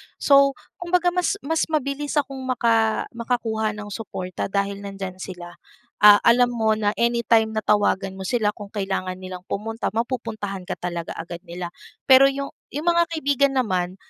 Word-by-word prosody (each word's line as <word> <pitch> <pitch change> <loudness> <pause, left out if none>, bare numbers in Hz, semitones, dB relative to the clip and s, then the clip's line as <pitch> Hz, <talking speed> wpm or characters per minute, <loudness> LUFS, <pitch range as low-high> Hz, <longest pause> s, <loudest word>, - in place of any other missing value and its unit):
So, 275 -1 +4 0.2
kumbaga 355 0 +1
mas 360 +2 0
mas 320 +3 0
mabilis 290 -1 -2
akong 275 -2 -1
maka 225 -3 +2
makakuha 225 -3 -2
nung 210 -1 -8
suporta 185 -4 -5
dahil 200 0 -2
nandiyan 195 -2 -7
sila. 175 -2 -8 0.5
Ah, 205 0 +10
alam 245 +1 +4
mo 220 -2 +1
na 210 -1 0
anytime 235 -2 +2
na 215 - -1
tawagan 205 -2 +2
mo 190 0 -7
sila, 220 -4 +1
kung 205 -1 -10
kailangan 195 -2 -3
nilang 185 0 -8
pumunta, 225 +3 -3
mapupuntahan 220 -6 -3
ka - - -3
talaga 175 -1 -5
agad 170 +1 -7
nila. 175 0 -5 0.4
Pero 265 +1 +9
'yong 275 0 -3 0.2
'yong 295 - -3
mga 340 0 +4
kaibigan 280 -3 +1
naman, 185 -7 0
220 Hz, 160 wpm, -23 LUFS, 195-265 Hz, 0.5 s, Ah